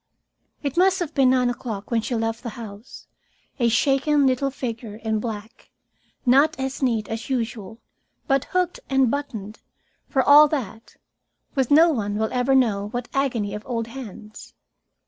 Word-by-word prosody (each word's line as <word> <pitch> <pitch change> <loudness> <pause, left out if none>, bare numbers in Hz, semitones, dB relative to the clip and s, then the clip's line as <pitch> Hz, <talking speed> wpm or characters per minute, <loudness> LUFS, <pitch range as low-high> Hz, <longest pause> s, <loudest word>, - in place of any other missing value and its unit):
It 280 +2 -3
must 375 +1 +4
have 340 -5 -4
been 270 -4 +4
nine 250 -1 +3
o'clock 225 -4 -6
when 230 -1 +2
she 240 +2 -3
left 225 0 -2
the 245 - -5
house, 220 0 -10 0.5
a 235 -1 +3
shaken 275 +4 +2
little 265 +1 +1
figure 230 -5 -6
in 220 0 -2
black, 220 0 -7 0.6
not 275 +4 +4
as 265 +1 -3
neat 230 -5 0
as 225 +3 -5
usual, 230 -4 -3 0.5
but 275 -1 +1
hooked 360 -1 -1
and 265 -3 +3
buttoned, 225 -7 -5 0.5
for 265 -2 +2
all 295 +2 +8
that, 230 -7 -5 0.6
with 265 -4 0
no 325 +3 +6
one 205 -7 -2
will 220 +1 -1
ever 255 +2 +2
know 210 -6 +2
what 245 +1 -5
agony 240 -7 -1
of 210 - -5
old 230 -3 -2
hands. 220 -4 -10
245 Hz, 160 wpm, -23 LUFS, 225-275 Hz, 0.6 s, all